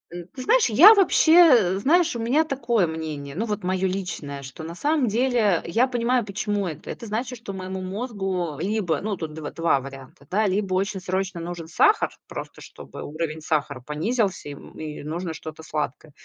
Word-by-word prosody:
н 175 0 -7
ты 255 - -6
знаешь, 485 - +4
я 350 - +9
вообще 365 -5 +4
э, 245 - +6
знаешь, 330 - +3
у - - -3
меня 260 +8 +2
такое 245 - 0
мнение, 155 -3 -5
ну 220 +5 -1
вот 210 -3 -3
моё 185 +1 0
личное. 170 -7 -5
Что 135 +4 -9
на 165 +1 -7
самом 290 - +1
деле 225 -5 +2
я 230 +10 +2
понимаю, 245 0 +1
почему 205 -1 -2
это. 155 -1 -7
Это 230 - -8
значит, 240 +3 -3
что 215 -4 -7
моему 190 0 -5
мозгу 190 - -3
либо, 195 -3 -1
ну, 210 -1 -2
тут 155 -2 -6
дв 155 -2 -6
два 165 -4 +2
варианта, 135 +1 -11
да. 210 +3 +1
Либо 195 0 -1
очень 195 +1 -1
срочно 185 0 -2
нужен 170 -1 -6
сахар, 160 - +3 0.2
просто - - -8
чтобы - - -11
уровень 155 +1 -4
сахара 145 -4 -1
понизился, 185 - -1
и, - - -6
м, 140 - -13
и 155 -1 -6
нужно 165 +2 -4
что-то 155 0 -9
сладкое. 150 0 -4
190 Hz, 190 wpm, -24 LUFS, 160-230 Hz, 0.2 s, я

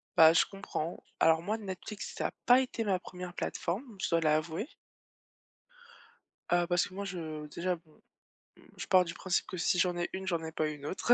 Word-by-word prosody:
Bah 160 0 +9
je 165 - +5
comprends. 195 -4 -4 0.2
Alors 160 0 +5
moi, 210 +6 -1
Netflix, 200 0 -6
ça - - 0
a - - -7
pas 245 +2 +7
été 250 -3 -2
ma 195 -4 +1
première 180 -1 -8
plateforme, 205 +7 -3
je 155 - -1
dois 165 0 +3
l'avouer 160 - +1 1.8
Ah 175 0 +3
parce 175 -1 +2
que - - -15
moi 200 +1 -4
je 160 -5 -5
déjà 180 +4 -1
bon, 160 -2 -25 0.8
je - - -4
pars 185 -1 +6
du 170 -1 -5
principe 185 -1 0
que 185 - -5
si 175 +1 +2
j'en 175 0 +2
ai 175 - -1
une, 190 0 -4
j'en 170 -3 0
ai 160 - -5
pas 155 -1 0
une 150 -2 -7
autre. 195 +9 +3
175 Hz, 200 wpm, -32 LUFS, 160-190 Hz, 1.8 s, Bah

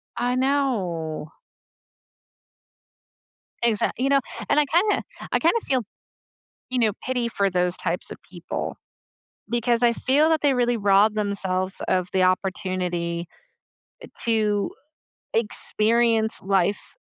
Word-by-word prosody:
I 245 +1 0
know. 195 - -1 2.3
Exact 230 -3 +1
you 260 +2 +1
know, 275 0 +4 0.3
and 290 - +3
I - - +4
kinda 365 +8 +2 0.3
I - - +3
kinda 340 +8 +2
feel, 260 -2 0 0.9
you 255 0 -1
know, 225 -3 +3
pity 250 -2 0
for 200 -4 0
those 180 -1 0
types - - -3
of - - -7
people - - -5 0.7
because 240 0 +1
I 235 -1 +5
feel 285 +6 +3
that 320 -1 +2
they 285 -2 +3
really 245 -1 +1
rob 205 +1 +4
themselves 190 -3 -2
of 185 -1 0
the 190 -1 +3
opportunity 180 -2 -1 1.0
to 215 -3 +1 0.6
experience 225 0 +1
life, 195 +1 0
220 Hz, 115 wpm, -24 LUFS, 185-250 Hz, 2.3 s, I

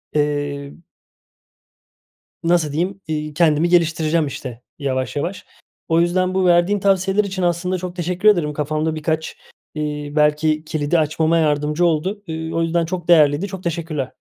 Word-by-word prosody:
eee 145 -1 -1 1.7
nasıl 165 -3 +2
diyeyim, 180 +6 -2
iii, 150 -1 -3
kendimi 160 +1 +3
geliştireceğim 165 -2 +2
işte 125 -3 -7 0.2
yavaş 130 -2 -2
yavaş. 175 +7 -3 0.4
O 165 +1 +3
yüzden 185 +2 +1
bu 190 0 +1
verdiğin 175 +3 +3
tavsiyeler 195 +1 +2
için 190 -2 -3
aslında 175 +1 0
çok 180 0 -6
teşekkür 180 +3 +2
ederim. 170 -7 +2
Kafamda 155 +2 -1
birkaç, 155 +1 -2 0.4
iii, 150 -1 -4
belki 155 +1 +2
kilidi 155 +2 0
açmama 160 +2 +1
yardımcı 150 +2 +1
oldu. 185 +6 -1
İii, 160 0 -4
o 165 - +1
yüzden 165 0 +1
çok 175 0 -5
değerliydi. 155 +1 +4
Çok 190 -1 -8
teşekkürler. 160 -6 -3
160 Hz, 145 wpm, -20 LUFS, 150-175 Hz, 1.7 s, değerliydi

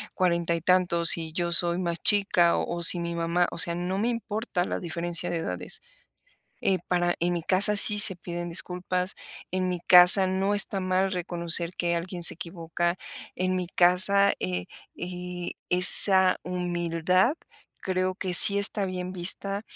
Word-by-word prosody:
40 170 -2 -2
y 165 - -7
tantos, 175 -1 +2
y 160 -1 -9
yo 170 0 -4
soy 170 0 +1
más 170 -2 -5
chica, 195 -5 +1
o 170 - -5
o - - -7
si 175 +1 +7
mi 170 0 -6
mamá, 170 +1 -2
o - - -10
sea, 170 +1 0
no 180 +2 -5
me 215 +4 -3
importa 220 -4 -5
la - - -6
diferencia 175 0 -6
de 170 - -4
edades, 165 - -6 0.8
eh, 190 -1 -2
para 175 -1 -2
en 175 +1 -2
mi 170 -1 -6
casa 195 +4 +3
sí 210 0 +7
se 200 -2 +7
piden 175 0 -9
disculpas, 180 +1 -5 0.4
en 185 0 -3
mi 180 -1 -5
casa 180 +2 +7
no 190 +2 -3
está 200 -1 +4
mal 185 +1 -3
reconocer 170 -1 -1
que 170 -1 -3
alguien 175 +1 -7
se - - +4
equivoca, 170 0 -6 0.4
en 185 0 -3
mi 180 -1 -6
casa, 185 +3 +1
eh 90 -1 -5 0.3
eh, 180 0 -8 0.2
esa 185 +1 +4
humildad 180 - -3 0.5
creo 185 0 -4
que 185 -2 -6
sí 200 +3 +9
está 200 0 0
bien 185 -1 -7
vista, 195 +3 -3
180 Hz, 165 wpm, -24 LUFS, 170-185 Hz, 0.8 s, sí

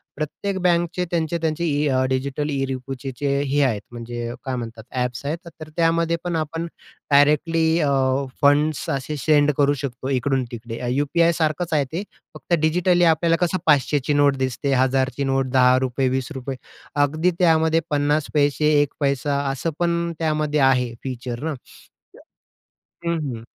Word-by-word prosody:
प्रत्येक 170 +7 -3
बँकचे 175 0 +1
त्यांचे-त्यांचे 165 0 -1
इ 150 -1 +1
अ, 130 -1 +2
डिजिटल 140 +3 -2
ई-रुपीचे 135 -1 -4
चे 145 - 0
हे 145 +1 +1
आहेत, 115 -7 0
म्हणजे 120 0 -5
काय 130 -1 -2
म्हणतात 115 -2 -6
ॲप्स 125 0 -3
आहेत. 155 +4 -1
तर 170 - -8
तर 155 - -8
त्यामध्ये 165 0 +2
पण 175 -1 -1
आपण 165 +2 -3 0.4
डायरेक्टली 160 +3 +3
अ, 150 -3 +2 0.5
फंड्स 145 +2 +2
असे 140 +2 -3
सेंड 145 +1 +3
करू 145 0 +4
शकतो 130 -1 -5
इकडून-तिकडे. 125 -3 -2
यू-पी-आय 165 +5 +2
सारखंच 160 +1 0
आहे 145 -2 +2
ते, 180 +5 -2 0.3
फक्त - - -5
डिजिटली 175 +2 +3
आपल्याला 165 +1 +1
कसं 175 +2 -1
500 145 -1 +3
ची 150 - +2
नोट 145 -1 +4
दिसते, 130 +2 -1
1,000 130 0 +2
ची 140 - 0
नोट, 135 0 0
₹10, 130 0 +3
₹20, 130 +1 -3 0.5
अगदी 155 +5 +1
त्यामध्ये 160 -2 +3
50 145 +1 +1
पैसे 150 +1 +3
1 145 -1 -1
पैसा 140 0 0
असं 135 +5 -2
पण 170 0 0
त्यामध्ये 155 -2 0
आहे 125 -2 0
फीचर 125 -1 -5
ना. 160 0 -1
तर 130 - -18 1.0
हं, 170 - +1 0.2
हं. 115 0 -10
145 Hz, 155 wpm, -22 LUFS, 130-160 Hz, 1.0 s, करू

